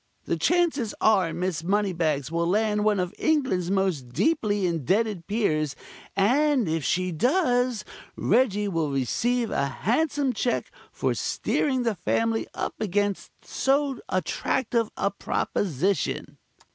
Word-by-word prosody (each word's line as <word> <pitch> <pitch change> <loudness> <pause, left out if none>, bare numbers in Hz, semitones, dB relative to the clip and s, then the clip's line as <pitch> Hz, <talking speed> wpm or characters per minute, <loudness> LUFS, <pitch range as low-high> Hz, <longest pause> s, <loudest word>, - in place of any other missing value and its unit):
The - - 0
chances 325 -10 +1
are 195 -6 +3
Miss 175 -3 -2
Moneybags 170 -7 0
will 170 0 0
land 210 +2 +1
one 210 -2 +2
of 180 +1 -2
England's 265 - +1
most 190 -10 0
deeply 205 - +1
indebted 180 - 0
peers, 155 -10 0 0.4
and 255 - +3
if 160 -1 -1
she 185 +4 0
does, 245 - +1 0.3
Reggie 210 -2 +2
will 165 -6 -1
receive 230 - 0
a 140 - +1
handsome 275 - 0
cheque 245 +2 -1 0.2
for - - -1
steering 260 -4 0
the 230 -2 +1
family 225 +5 0
up - - -3
against 205 0 -1 0.2
so 275 -2 0
attractive 225 +6 0
a 200 - 0
proposition." 195 -2 -1
205 Hz, 120 wpm, -26 LUFS, 175-245 Hz, 0.4 s, are